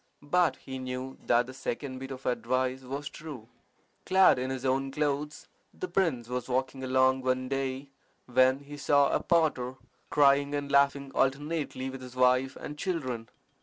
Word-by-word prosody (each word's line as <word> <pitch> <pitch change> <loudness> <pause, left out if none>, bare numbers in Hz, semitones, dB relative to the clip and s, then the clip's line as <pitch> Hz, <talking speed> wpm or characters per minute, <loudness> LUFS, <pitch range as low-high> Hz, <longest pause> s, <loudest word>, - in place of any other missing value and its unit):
But 175 +3 +2
he 130 -1 -8
knew 130 +1 -5
that 120 0 +4
the 130 - -9
second 130 0 -4
bit 135 0 -7
of 135 -1 -8
advice 130 +1 0
was 135 +3 -5
true. 145 -8 -9 0.6
Clad 190 -7 +5
in 130 +1 -2
his 130 0 -4
own 135 +1 +1
clothes, 150 +1 -2 0.3
the 370 - -4
prince 160 - 0
was 125 0 -4
walking 130 +1 -1
along 130 0 +3
one 130 0 0
day 135 +1 -3 0.3
when 130 +2 +3
he 145 +1 -10
saw 145 -1 +3
a - - +2
potter 150 -7 +1 0.3
crying 140 0 +4
and 145 -1 -3
laughing 140 0 +3
alternately 140 0 -1
with 135 0 -8
his 125 0 -10
wife 130 +1 +3
and 150 0 -8
children. 130 - -3
135 Hz, 165 wpm, -29 LUFS, 130-145 Hz, 0.6 s, Clad